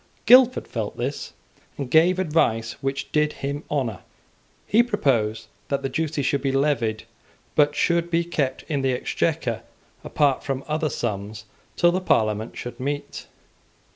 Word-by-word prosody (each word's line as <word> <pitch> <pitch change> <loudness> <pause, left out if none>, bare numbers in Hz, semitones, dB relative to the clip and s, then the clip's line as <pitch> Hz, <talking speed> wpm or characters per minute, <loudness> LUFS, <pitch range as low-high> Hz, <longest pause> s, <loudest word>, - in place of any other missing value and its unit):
Guildford 250 0 +6
felt 110 -3 -4
this, 135 +4 -4 0.4
and 135 -3 -5
gave 170 +3 +5
advice 120 -10 +1
which 135 0 -3
did 150 0 +2
him 145 +1 -3
honour. 125 -10 -1 0.7
He 225 - +4
proposed 115 - 0 0.2
that 140 - -2
the 135 - -1
duties 155 -3 -2
should 140 +1 +1
be 135 - 0
levied, 130 -6 0 0.5
but 145 -1 +3
should 170 0 +1
be 170 0 +2
kept 145 -6 -2
in 145 -4 -1
the 135 -1 +1
Exchequer 125 -1 -1 0.4
apart 140 -3 +1
from 135 -1 -3
other 155 0 0
sums 105 -3 -4 0.3
till 175 - +4
the 185 +2 -1
Parliament 110 - 0
should 120 - -7
meet. 145 +2 -4
140 Hz, 145 wpm, -24 LUFS, 120-160 Hz, 0.7 s, Guildford